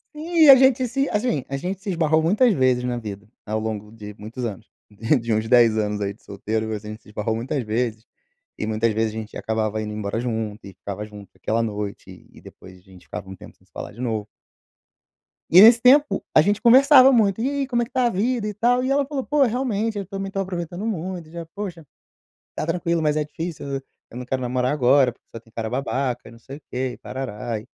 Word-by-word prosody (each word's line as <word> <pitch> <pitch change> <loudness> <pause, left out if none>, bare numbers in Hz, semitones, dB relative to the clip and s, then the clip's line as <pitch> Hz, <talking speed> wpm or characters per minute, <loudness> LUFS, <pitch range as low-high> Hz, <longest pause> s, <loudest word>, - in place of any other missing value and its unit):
E 320 +1 +3
a 275 - +12
gente 260 -1 +4
se 275 +4 -1
assim, 210 - 0
a 135 - -2
gente 185 +5 -4
se 210 - -5
esbarrou 160 -3 +2
muitas 210 +8 +3
vezes 130 -5 +2
na 125 -1 -2
vida, 105 -2 -7 0.2
ao 110 +1 -1
longo 110 -1 -5
de 105 -2 -10
muitos 115 +4 -6
anos. 110 -1 -7 0.5
De 115 -1 -2
uns 110 +1 0
10 120 -3 +5
anos 105 -1 -1
aí 100 0 -2
de 100 - -26
solteiro, 110 +2 -3
a 110 - -2
gente 105 +1 -9
se - - -19
esbarrou 110 +1 -2
muitas 130 +4 -3
vezes, 115 0 -2 0.5
e 105 - -4
muitas 110 +1 0
vezes 110 +1 0
a - - -5
gente 110 -1 -7
acabava 110 -1 -2
indo 105 0 -5
embora 105 +1 -3
junto 110 -3 -3
e 95 - -11
ficava 100 +3 -7
junto 105 -2 -12
aquela 115 +1 -1
noite 105 -2 -6
e - - -16
depois 95 0 -14
a 90 - -21
gente 95 -1 -18
ficava 105 -2 -7
um 95 - -8
tempo - - -14
sem - - -29
se - - -37
falar - - -7
de 115 +4 -11
novo. 110 -4 -2 1.2
E 180 - +8
nesse 230 +2 +8
tempo 255 -5 +4
a 155 - +8
gente 205 +6 +1
conversava 265 +2 +7
muito: 220 -4 +2
"E 255 - +1
aí 280 -1 -2
como 240 -2 0
é - - 0
que - - -19
está 255 -2 +1
a - - +2
vida 225 +2 -1
e 210 - -3
tal?". 245 +4 +2
E 260 - -1
ela 280 0 +2
falou: 275 -1 -4
"Pô, 295 -1 +3
realmente 230 -3 -1
eu 200 - -4
também 195 +1 -5
estou 195 0 -3
aproveitando 180 +1 -5
muito 180 -5 -4
e - - -18
já, 170 -1 -7
poxa, 180 -6 -6 0.7
está - - -4
tranquilo 170 0 -1
mas 150 -1 +1
é 155 - +1
difícil, 160 +1 -6 0.4
eu 120 - -10
não 125 - -6
quero 130 +1 -2
namorar 125 0 0
agora 135 -2 +4
porque - - -26
só - - -5
tem 115 0 -24
cara 110 -1 -3
babaca 130 -1 -2
e - - -12
não 115 - -15
sei 135 +4 -10
o - - -18
quê 130 0 -2
e - - -12
tarará". 120 -3 -5
130 Hz, 235 wpm, -23 LUFS, -, 1.2 s, a